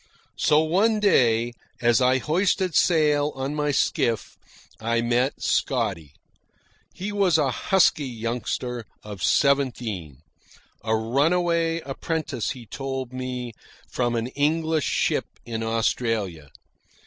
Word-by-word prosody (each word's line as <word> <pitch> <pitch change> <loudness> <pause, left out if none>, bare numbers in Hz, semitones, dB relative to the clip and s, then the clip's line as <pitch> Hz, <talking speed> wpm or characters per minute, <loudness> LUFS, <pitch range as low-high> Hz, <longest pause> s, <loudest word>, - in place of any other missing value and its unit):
So, 150 +1 +4
one 200 +8 +2
day, 120 - +3 0.3
as 120 +1 +3
I 130 +1 +4
hoisted 180 +5 0
sail 150 -4 +3
on 135 +2 -3
my 150 -1 -1
skiff, 120 -5 0 0.4
I 115 +1 0
met 120 +3 0
Scotty. 95 - -1 0.8
He 200 +3 -5
was 195 -5 +3
a 140 -4 +1
husky 155 - +2
youngster 120 0 -4 0.2
of 105 -3 -8
seventeen, 115 - 0 0.6
a 110 0 +1
runaway 165 +8 +1
apprentice, 140 -2 -3
he 125 -3 -6
told 135 0 -5
me, 125 -2 -5 0.4
from 120 -1 0
an 115 0 -1
English 155 +2 0
ship - - +1 0.2
in 115 -1 -4
Australia. 110 - -1
130 Hz, 110 wpm, -24 LUFS, 115-155 Hz, 0.8 s, So